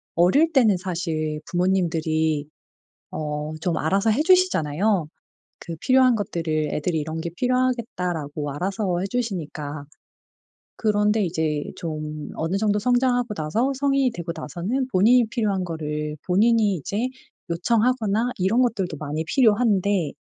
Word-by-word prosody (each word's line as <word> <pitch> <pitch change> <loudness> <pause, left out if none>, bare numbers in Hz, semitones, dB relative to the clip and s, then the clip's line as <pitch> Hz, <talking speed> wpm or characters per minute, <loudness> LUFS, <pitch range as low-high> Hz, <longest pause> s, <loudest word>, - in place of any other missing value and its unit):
어릴 235 - +4
때는 230 - +4
사실 165 -4 -3
부모님들이 160 -4 0 0.7
어 150 0 -4
좀 170 0 -1
알아서 195 +8 +1
해 255 +8 +2
주시잖아요. 210 - +2 0.5
그 165 -1 -7
필요한 255 -1 +4
것들을 160 -6 -2
'애들이 160 +1 -1
이런 160 +2 -4
게 170 - -4
필요하겠다.'라고 180 - -1
알아서 185 +3 -2
해 - - -2
주시니까. 155 -10 -4 0.9
그런데 210 0 +2
이제 160 -3 -1
좀 155 -2 -5
어느 165 +4 -1
정도 210 0 +1
성장하고 245 0 +1
나서 210 - 0
성인이 275 -2 +2
되고 170 -3 -5
나서는 180 - -3
본인이 230 +6 +5
필요한 210 -6 -1
거를 150 -2 -4
본인이 210 +2 +3
이제 200 - -2 0.4
요청하거나 225 +5 +1
이런 195 +7 +2
것들도 195 -10 -1
많이 150 +2 -3
필요한데, 205 - +2
185 Hz, 305 characters per minute, -23 LUFS, 155-230 Hz, 0.9 s, 본인이